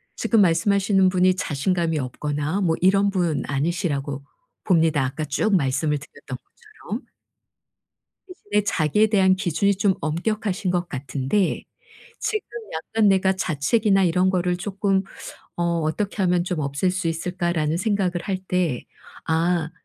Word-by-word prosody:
지금 225 Hz, -3 st, +2 dB
말씀하시는 190 Hz, +2 st, +3 dB
분이 185 Hz, 0 st, +3 dB
자신감이 165 Hz, 0 st, -1 dB
없거나 150 Hz, +6 st, -2 dB
뭐 165 Hz, -4 st, +2 dB
이런 195 Hz, +2 st, +4 dB
분 175 Hz, -5 st, 0 dB
아니시라고 145 Hz, -2 st, -2 dB, 0.4 s
봅니다. 160 Hz, -6 st, +3 dB
아까 135 Hz, +4 st, -3 dB
쭉 195 Hz, +9 st, +1 dB
말씀을 150 Hz, -1 st, +1 dB
드렸던 140 Hz, -2 st, -9 dB
것처럼. 430 Hz, -, -10 dB, 1.2 s
대신에 210 Hz, -, -2 dB
자기에 200 Hz, +2 st, +2 dB
대한 190 Hz, -3 st, +4 dB
기준이 195 Hz, +2 st, +1 dB
좀 195 Hz, 0 st, +2 dB
엄격하신 190 Hz, +4 st, -1 dB
것 175 Hz, -1 st, -1 dB
같은데 135 Hz, +7 st, -1 dB, 0.6 s
'지금 430 Hz, -2 st, -2 dB, 0.3 s
약간 210 Hz, +7 st, 0 dB
내가 190 Hz, 0 st, +3 dB
자책이나 195 Hz, +4 st, +1 dB
이런 180 Hz, +2 st, +2 dB
거를 180 Hz, -1 st, 0 dB
쪼끔 195 Hz, 0 st, 0 dB, 0.5 s
어 175 Hz, -, -1 dB, 0.2 s
어떻게 195 Hz, +6 st, -2 dB
하면 180 Hz, -1 st, +2 dB
좀 180 Hz, -3 st, -2 dB
없앨 140 Hz, +6 st, 0 dB
수 180 Hz, -2 st, -1 dB
있을까' 175 Hz, +1 st, -2 dB
라는 155 Hz, -1 st, 0 dB
생각을 200 Hz, -1 st, 0 dB
할 195 Hz, -2 st, -2 dB
때 175 Hz, -9 st, 0 dB, 0.4 s
'아 165 Hz, 0 st, +1 dB
180 Hz, 295 characters per minute, -23 LUFS, 155-195 Hz, 1.2 s, 이런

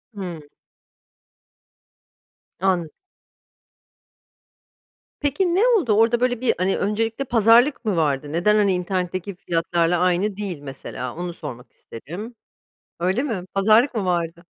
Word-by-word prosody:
Hıı. 180 Hz, -5 st, -6 dB, 2.2 s
Anladım. 180 Hz, -4 st, +1 dB, 2.3 s
Peki, 340 Hz, +5 st, 0 dB
ne 445 Hz, +6 st, +4 dB
oldu? 370 Hz, -, +3 dB
Orada, 225 Hz, +2 st, +3 dB
böyle, 250 Hz, -1 st, 0 dB
bir, 255 Hz, -, +3 dB
hani, 185 Hz, +2 st, +1 dB
öncelikle 225 Hz, +5 st, -1 dB
pazarlık 235 Hz, +3 st, +4 dB
mı 205 Hz, -4 st, +1 dB
vardı? 145 Hz, -2 st, 0 dB
Neden, 210 Hz, +5 st, +3 dB
hani, 200 Hz, -3 st, +3 dB
internetteki 180 Hz, +1 st, -3 dB
fiyatlarla 170 Hz, 0 st, 0 dB
aynı 185 Hz, +3 st, +1 dB
değil 190 Hz, -7 st, -4 dB
mesela? 135 Hz, -2 st, -7 dB
Onu 175 Hz, 0 st, -5 dB
sormak 130 Hz, -8 st, -9 dB
isterim. 190 Hz, -, -9 dB, 0.7 s
Öyle 190 Hz, +9 st, +1 dB
mi? 220 Hz, -11 st, -3 dB
Pazarlık 220 Hz, +7 st, +4 dB
mı 210 Hz, -4 st, -1 dB
vardı? 170 Hz, -1 st, -2 dB
190 Hz, 115 wpm, -22 LUFS, 170-225 Hz, 2.3 s, ne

